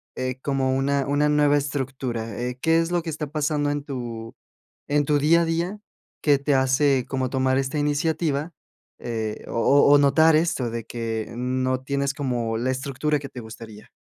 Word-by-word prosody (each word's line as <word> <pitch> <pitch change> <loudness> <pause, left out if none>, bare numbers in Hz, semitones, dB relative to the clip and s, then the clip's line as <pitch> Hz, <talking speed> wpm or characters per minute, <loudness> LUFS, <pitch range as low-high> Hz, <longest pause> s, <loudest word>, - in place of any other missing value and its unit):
eh, 130 0 -3
como 135 -2 0
una 140 0 0
una 145 +1 +2
nueva 145 -1 +4
estructura?, 130 -6 -3
eh, 125 +1 -3
¿qué 165 0 +3
es 165 +1 -1
lo 175 -1 +1
que 165 - -4
está 150 -1 -4
pasando 150 -1 0
en 145 -1 -3
tu 120 -5 -6 0.5
en 145 0 +1
tu 150 0 +2
día 165 +4 +4
a - - +1
día 170 +5 -2 0.4
que 145 -2 +4
te 140 0 0
hace 135 0 +2
como 130 -2 -1
tomar 130 0 +1
esta 135 +3 -2
iniciativa?, 150 +1 0 0.5
eh, 110 -2 -4
o - - -5
o 140 +4 +5
o - - +8
notar 160 +3 +5
esto 155 -7 +1
de 115 -1 -5
que 115 -2 -4
no 130 +1 -1
tienes 140 0 -1
como 120 -6 -2
la 125 +3 -1
estructura 140 +3 -1
que 140 -1 -8
te 125 - -9
gustaría. 110 -1 -11
140 Hz, 185 wpm, -24 LUFS, 125-150 Hz, 0.5 s, o